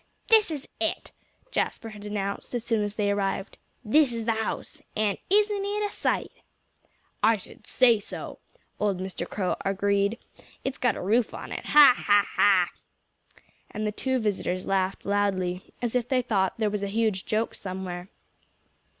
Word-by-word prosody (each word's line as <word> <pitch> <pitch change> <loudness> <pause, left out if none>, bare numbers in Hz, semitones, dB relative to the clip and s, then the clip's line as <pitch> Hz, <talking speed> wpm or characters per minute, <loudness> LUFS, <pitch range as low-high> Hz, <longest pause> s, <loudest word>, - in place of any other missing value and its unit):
"This 440 -4 +6
is 295 -4 -5
it!" - - -2 0.4
Jasper 225 - -1
had 210 -1 -9
announced, 200 +3 -3
as 240 - -2
soon 230 -2 +1
as 205 0 -3
they 205 -2 +1
arrived. 195 0 -2 0.3
"This 280 +4 +4
is 230 -1 -3
his 225 -1 +1
house. 220 -1 -4 0.2
And 210 -2 +1
isn't 410 0 +3
it 415 +1 -1
a - - -10
sight?" - - -1 0.9
"I 225 +1 +5
should 195 - -15
say 240 -4 +4
so!" 200 - -8 0.4
old 205 -3 +1
Mr. 190 0 -5
Crow 185 -3 -1
agreed. 200 +2 +1 0.5
"It's 265 0 -3
got 245 - +2
a - - -5
roof 220 +5 +1
on - - -8
it - - -5
ha! 295 -4 +9
ha!" 200 -3 +4 1.0
And 215 - -4
the 210 - 0
two 260 +5 -1
visitors 190 -5 -1
laughed 190 0 0
loudly, 190 -3 0
as 240 0 -1
if 245 -1 0
they 255 -2 +2
thought 195 -5 +1
there 215 -2 0
was 210 -1 -2
a 200 - -1
huge 215 -2 0
joke 220 +1 0
somewhere. 185 -1 -6
210 Hz, 165 wpm, -27 LUFS, 195-240 Hz, 1.0 s, ha